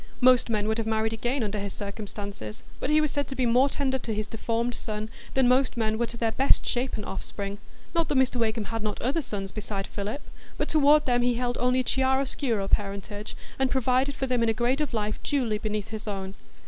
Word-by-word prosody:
Most 250 Hz, -1 st, +5 dB
men 210 Hz, -2 st, 0 dB
would 220 Hz, +1 st, 0 dB
have 225 Hz, -, -1 dB
married 220 Hz, 0 st, +1 dB
again 240 Hz, +3 st, -1 dB
under 210 Hz, 0 st, -2 dB
his 200 Hz, -1 st, -4 dB
circumstances, 200 Hz, -, -6 dB, 0.2 s
but -, -, -2 dB
he 305 Hz, 0 st, +5 dB
was 305 Hz, -2 st, +1 dB
said 285 Hz, -2 st, -1 dB
to 270 Hz, -, -5 dB
be 255 Hz, -, +1 dB
more 250 Hz, +4 st, +4 dB
tender 265 Hz, -2 st, 0 dB
to 225 Hz, -3 st, -3 dB
his 215 Hz, 0 st, -1 dB
deformed 230 Hz, +2 st, -1 dB
son 215 Hz, -1 st, -4 dB, 0.2 s
than 265 Hz, -2 st, +5 dB
most 255 Hz, 0 st, +3 dB
men 220 Hz, -1 st, 0 dB
were 235 Hz, -, +1 dB
to 235 Hz, -, -6 dB
their 225 Hz, -1 st, +1 dB
best 265 Hz, +5 st, +3 dB
shapen 245 Hz, -4 st, -1 dB
offspring. 200 Hz, +1 st, -3 dB, 0.3 s
Not 335 Hz, -2 st, +2 dB
that 285 Hz, -, +2 dB
Mr 260 Hz, -1 st, +3 dB
Wakem 225 Hz, -1 st, +1 dB
had 225 Hz, +2 st, -4 dB
not 210 Hz, -1 st, -2 dB
other 275 Hz, +7 st, 0 dB
sons 200 Hz, -7 st, -5 dB
beside 200 Hz, -1 st, -4 dB
Philip; 210 Hz, +8 st, -4 dB, 0.3 s
but -, -, -1 dB
toward 300 Hz, 0 st, +5 dB
them 245 Hz, -1 st, +2 dB
he 245 Hz, 0 st, +2 dB
held 245 Hz, 0 st, -1 dB
only 250 Hz, +1 st, +3 dB
a -, -, -3 dB
chiaroscuro 265 Hz, -5 st, +1 dB
parentage, 205 Hz, +1 st, -1 dB, 0.2 s
and 265 Hz, -1 st, +3 dB
provided 260 Hz, +2 st, +2 dB
for 270 Hz, -, -1 dB
them 250 Hz, -2 st, +1 dB
in 230 Hz, -, +3 dB
a -, -, +3 dB
grade 245 Hz, +6 st, +1 dB
of 300 Hz, -, -1 dB
life 215 Hz, -1 st, -1 dB
duly 245 Hz, -7 st, 0 dB
beneath 210 Hz, -2 st, -2 dB
his 220 Hz, -1 st, -6 dB
own. 195 Hz, -2 st, -3 dB
230 Hz, 225 wpm, -27 LUFS, 210-260 Hz, 0.3 s, Most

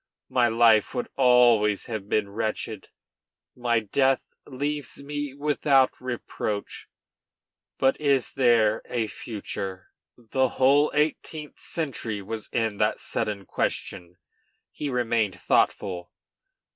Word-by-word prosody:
My 125 Hz, -2 st, +3 dB
life 115 Hz, 0 st, +4 dB
would 125 Hz, -, -2 dB
always 120 Hz, -5 st, +4 dB
have 110 Hz, -3 st, -5 dB
been 105 Hz, -2 st, +1 dB
wretched; 110 Hz, -1 st, -4 dB, 0.7 s
my 120 Hz, -2 st, +1 dB
death 130 Hz, +5 st, +2 dB, 0.2 s
leaves 145 Hz, +1 st, -4 dB
me 145 Hz, -1 st, -4 dB
without 140 Hz, -2 st, +3 dB
reproach. 120 Hz, -4 st, -4 dB, 0.9 s
But 135 Hz, +3 st, +2 dB
is 140 Hz, -4 st, +1 dB
there 115 Hz, -4 st, +3 dB
a 120 Hz, -3 st, 0 dB
future?" 100 Hz, -4 st, -6 dB, 0.3 s
The 130 Hz, +3 st, 0 dB
whole 140 Hz, +3 st, +5 dB
eighteenth 150 Hz, 0 st, -2 dB
century 130 Hz, -10 st, -3 dB
was 110 Hz, +2 st, -6 dB
in 110 Hz, -3 st, 0 dB
that -, -, +1 dB
sudden 100 Hz, -2 st, -3 dB
question. 90 Hz, 0 st, -3 dB, 0.5 s
He 145 Hz, -, -4 dB
remained 115 Hz, -7 st, 0 dB
thoughtful. 90 Hz, -3 st, 0 dB
120 Hz, 105 wpm, -26 LUFS, 105-135 Hz, 0.9 s, whole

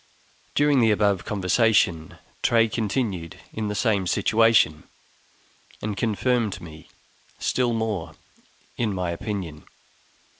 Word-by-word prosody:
During 145 Hz, -2 st, +4 dB
the 115 Hz, -2 st, +4 dB
above 100 Hz, -3 st, +1 dB
conversation, 100 Hz, -4 st, +1 dB, 0.2 s
Tray 115 Hz, -1 st, +3 dB
continued 105 Hz, -6 st, -2 dB, 0.2 s
in 110 Hz, -1 st, -3 dB
the 105 Hz, -, -3 dB
same 100 Hz, -4 st, +1 dB
situation, 110 Hz, -7 st, +3 dB, 0.9 s
and 105 Hz, -1 st, -3 dB
confirmed 115 Hz, +1 st, 0 dB
me 80 Hz, -1 st, -12 dB, 0.5 s
still 125 Hz, -2 st, 0 dB
more 110 Hz, -7 st, -2 dB, 0.6 s
in 110 Hz, -4 st, -1 dB
my 90 Hz, -2 st, -2 dB
opinion. 85 Hz, -4 st, -5 dB
105 Hz, 105 wpm, -24 LUFS, 90-115 Hz, 0.9 s, During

